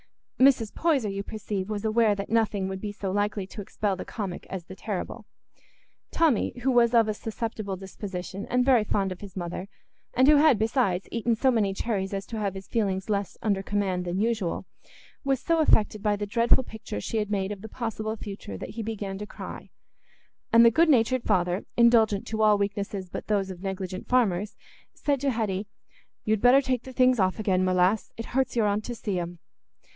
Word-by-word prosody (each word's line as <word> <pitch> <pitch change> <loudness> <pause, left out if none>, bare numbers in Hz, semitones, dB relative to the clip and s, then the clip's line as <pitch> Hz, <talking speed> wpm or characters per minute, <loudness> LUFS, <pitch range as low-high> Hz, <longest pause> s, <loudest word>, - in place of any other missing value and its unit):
Mrs. 255 -5 +4
Poyser, 280 -11 +1
you 195 - -3
perceive, 205 -2 -4
was 210 0 -3
aware 220 -1 +3
that 200 +1 -6
nothing 215 -4 +1
would 190 0 -5
be 210 - -3
so 200 -2 -4
likely 205 0 -1
to 205 +2 -8
expel 200 0 -2
the 185 - -6
comic 195 -5 -6
as 185 -3 -5
the 185 - -10
terrible. 200 -2 -5 0.8
Tommy, 310 -8 +1
who 265 - +3
was 240 -1 +4
of 225 -2 +5
a 215 - 0
susceptible 215 -2 -4
disposition, 190 0 -6
and 250 0 +2
very 255 -5 +5
fond 195 -2 0
of 185 - -7
his 200 -2 -9
mother, 180 +2 -5 0.5
and 260 +2 +5
who 300 0 +7
had, 290 -5 +5
besides, 220 -4 +1
eaten 230 0 +1
so 260 +4 +3
many 205 -5 +1
cherries 195 -3 -2
as 195 - -4
to 225 - -5
have 200 -2 -2
his 190 0 -8
feelings 195 -2 -1
less 200 -2 -2
under 200 -3 +1
command 195 -2 -1
than 180 +1 -2
usual, 215 -5 -1 0.6
was 270 -2 +1
so 330 +3 +1
affected 215 -8 +3
by 210 -1 +2
the 205 0 -3
dreadful 230 +4 +3
picture 220 - -7
she 220 - -3
had 210 -1 -1
made 195 -1 -1
of 200 -2 -6
the 220 - -8
possible 220 -2 -3
future 200 - -7
that - - -7
he 230 - -5
began 200 -3 -4
to 210 - -6
cry; - - -9 0.8
and 230 0 +7
the 230 - +7
good 330 +7 +4
natured 255 -1 +3
father, 180 -2 +1
indulgent 225 -4 +4
to 220 0 -3
all 210 -1 +5
weaknesses 200 -1 -3
but - - -6
those 200 -3 0
of 180 -1 -10
negligent 190 -1 -5
farmers, 210 -5 +1 0.4
said 280 -3 0
to 280 - +1
Hetty, 210 -5 -1 0.6
"You'd 215 -1 +1
better 250 +3 +6
take 255 -3 -1
the 260 +1 -10
things 255 -1 +4
off 185 -1 +2
again, 190 -4 +1
my 185 0 +2
lass; 185 +4 +2
it 230 - -5
hurts 260 -1 +1
your 230 -3 +3
aunt 205 +1 +1
to 240 - -4
see 200 -5 -2
'em." 175 0 -5
210 Hz, 205 wpm, -27 LUFS, 195-230 Hz, 0.8 s, who